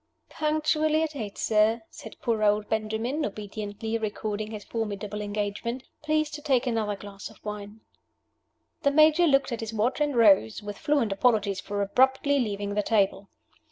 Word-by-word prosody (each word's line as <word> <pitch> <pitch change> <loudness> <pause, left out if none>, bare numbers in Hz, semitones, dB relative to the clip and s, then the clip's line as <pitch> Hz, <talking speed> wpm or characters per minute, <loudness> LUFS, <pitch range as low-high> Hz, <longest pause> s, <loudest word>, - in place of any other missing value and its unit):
"Punctually 310 0 +1
at 310 -2 -3
eight, 210 -6 -5
sir," 220 +1 +2
said 220 - -10
poor 225 -2 0
old 210 0 +2
Benjamin, 220 +7 -1
obediently 210 +1 -4
recording 215 0 -3
his 215 -2 -7
formidable 210 -2 -4
engagement. 210 +4 -3 0.2
"Please 310 0 0
to 300 -1 -7
take 270 -4 +2
another 220 -4 0
glass 200 0 -9
of 220 - -17
wine." 210 +1 -7 1.0
The 280 - +3
Major 310 +4 +5
looked 275 -2 +3
at 235 - -3
his 225 0 -5
watch, 240 +7 0
and 295 -2 +1
rose 200 - +4
with 205 -1 -7
fluent 285 -8 +1
apologies 200 -2 +2
for 205 0 -2
abruptly 265 +6 +3
leaving 205 -4 -2
the 210 - +1
table. 200 -2 +1
220 Hz, 160 wpm, -27 LUFS, 205-270 Hz, 1.0 s, Major